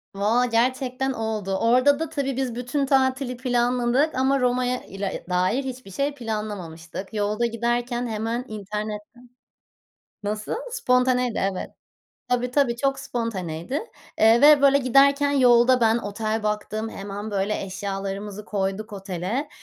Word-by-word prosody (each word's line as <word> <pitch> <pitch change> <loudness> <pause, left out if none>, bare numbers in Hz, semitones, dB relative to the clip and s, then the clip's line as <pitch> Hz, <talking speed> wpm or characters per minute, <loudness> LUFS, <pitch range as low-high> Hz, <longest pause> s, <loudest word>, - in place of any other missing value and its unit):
Valla 220 +5 +2
gerçekten 255 +2 0
oldu. 215 -4 -2
Orada 255 +5 +4
da, 325 - -2
tabii, 275 -4 -2
biz 260 -3 -2
bütün 250 +3 -1
tatili 260 -1 +1
planladık 245 +3 +1
ama 265 +1 +2
Roma'ya 250 0 +1
ile 195 0 -5
dair 185 +9 +1
hiçbir 255 -6 -7
şey 280 +7 -1
planlamamıştık 205 - -6
yolda 210 +2 0
giderken 240 +1 -1
hemen 225 +3 -2
internette 210 +1 -5 1.1
Nasıl? 210 +1 -3 0.2
Spontaneydi, 250 - +2
evet, 185 - -5 0.6
tabii, 250 0 0
tabii, 250 -3 +2
çok 270 +2 0
spontaneydi, 230 - -3 0.3
eee, 225 +2 +6
ve 290 -1 +7
böyle 280 0 +6
giderken 280 +2 +4
yolda 250 -2 +5
ben 225 0 +4
otel 215 +1 -3
baktım 215 +1 -2
hemen 205 +2 -6
böyle 200 +1 -1
eşyalarımızı 195 +1 -5
koyduk 205 +1 -3
otele, 195 - -3
235 Hz, 125 wpm, -24 LUFS, 210-255 Hz, 1.1 s, ve